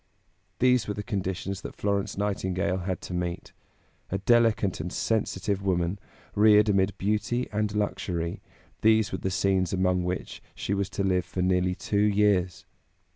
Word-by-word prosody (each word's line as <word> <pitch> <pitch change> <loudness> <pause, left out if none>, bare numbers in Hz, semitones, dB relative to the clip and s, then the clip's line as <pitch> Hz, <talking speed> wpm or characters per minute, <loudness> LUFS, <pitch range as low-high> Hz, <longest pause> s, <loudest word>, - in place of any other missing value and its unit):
These 125 -1 +3
were 105 - -2
the 105 - -4
conditions 95 -1 -3
that - - -8
Florence 100 -1 -1
Nightingale 95 -3 -1
had 95 -1 -3
to - - -7
meet. 90 -1 -4 0.6
A 95 - -1
delicate 110 -2 +2
and 85 +3 -4
sensitive 100 -2 -1
woman, 90 0 0 0.3
reared 105 0 +5
amid 95 0 +2
beauty 105 +5 0
and 105 0 -1
luxury, 85 -5 -2 0.4
these 110 -1 +4
were 95 - -3
the 95 - -2
scenes 95 -1 +1
among 90 -1 +1
which 90 +1 -4
she 100 - -2
was 100 -1 -1
to 100 - -2
live 90 -2 +1
for 90 - -3
nearly 90 0 +2
two 100 - -1
years. 100 -4 +2
95 Hz, 155 wpm, -27 LUFS, 90-105 Hz, 0.6 s, reared